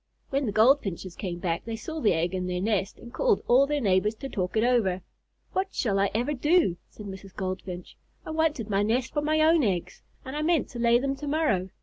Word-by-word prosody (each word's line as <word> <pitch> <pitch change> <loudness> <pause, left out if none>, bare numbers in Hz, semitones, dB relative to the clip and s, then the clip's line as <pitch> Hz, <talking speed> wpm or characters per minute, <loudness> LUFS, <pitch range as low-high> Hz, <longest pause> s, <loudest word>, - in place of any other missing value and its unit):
When 275 -1 0
the - - 0
Goldfinches 215 - +2
came 180 -3 -4
back, 170 -1 -2
they 230 0 -4
saw 315 +8 -6
the 215 - +4
egg 170 +2 -1
in 185 -1 -2
their 180 0 -2
nest 200 0 -1
and 235 - -12
called - - +2
all 265 +3 +5
their 295 0 0
neighbors 210 -1 +2
to 270 +5 -7
talk 185 -1 -2
it 220 - +3
over. 215 -7 +2 0.5
"What 380 +1 -2
shall 200 -5 +1
I 200 0 +2
ever 245 +6 0
do?" 295 - +2
said 210 - -11
Mrs. 190 -1 -9
Goldfinch. 185 -1 -5 0.3
"I - - -5
wanted 315 -8 0
my 200 -2 +1
nest 235 +5 0
for 295 - 0
my 310 +1 +1
own 320 +1 +5
eggs, 185 -6 -2 0.2
and 265 +2 -6
I 300 - -1
meant 320 0 +1
to 240 - -8
lay 235 0 +4
them 275 +2 -1
to 295 - -6
morrow. 280 - +1
225 Hz, 230 wpm, -27 LUFS, 190-290 Hz, 0.5 s, all